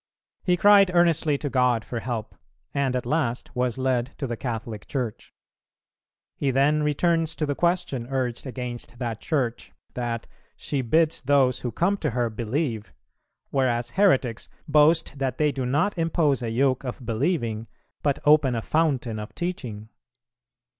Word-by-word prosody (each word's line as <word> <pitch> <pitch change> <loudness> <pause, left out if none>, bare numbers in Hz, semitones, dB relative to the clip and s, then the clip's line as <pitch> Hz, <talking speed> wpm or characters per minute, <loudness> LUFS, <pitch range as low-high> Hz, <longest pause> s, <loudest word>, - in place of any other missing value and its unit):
He 180 -1 +2
cried 200 0 +6
earnestly 165 -4 +3
to 145 - -4
God 125 -4 +2
for 120 - -4
help, 115 -2 -4 0.4
and 135 -2 0
at 125 - -2
last 130 -7 -1
was 125 0 0
led 130 0 0
to 145 - -3
the 120 -2 -3
Catholic 115 -3 -5
Church. 125 -6 -4 1.0
He 140 - -1
then 140 +3 +3
returns 165 +2 +1
to 155 - -1
the 145 - -1
question 170 -7 0
urged 130 -1 -2
against 125 -1 -6
that 120 -3 -4
Church, 125 -7 -2 0.2
that 120 -2 -3 0.3
"she 140 -2 -2
bids 160 +6 +2
those 135 -2 +3
who 120 - -3
come 185 - +1
to 155 - -1
her 120 -2 +1
believe," 115 0 -3 0.6
whereas 120 -3 0
heretics 135 - +2 0.2
"boast 150 0 +3
that 130 -3 -1
they 150 -1 +2
do 130 -3 -3
not 150 +11 +1
impose 160 -5 +1
a 115 - -2
yoke 130 +3 +1
of 125 -1 -6
believing, 115 -2 -1 0.3
but 145 -2 +1
open 150 -4 +5
a 115 - -2
fountain 135 -8 0
of 105 - -8
teaching." 120 -12 -5
130 Hz, 155 wpm, -25 LUFS, 120-150 Hz, 1.0 s, cried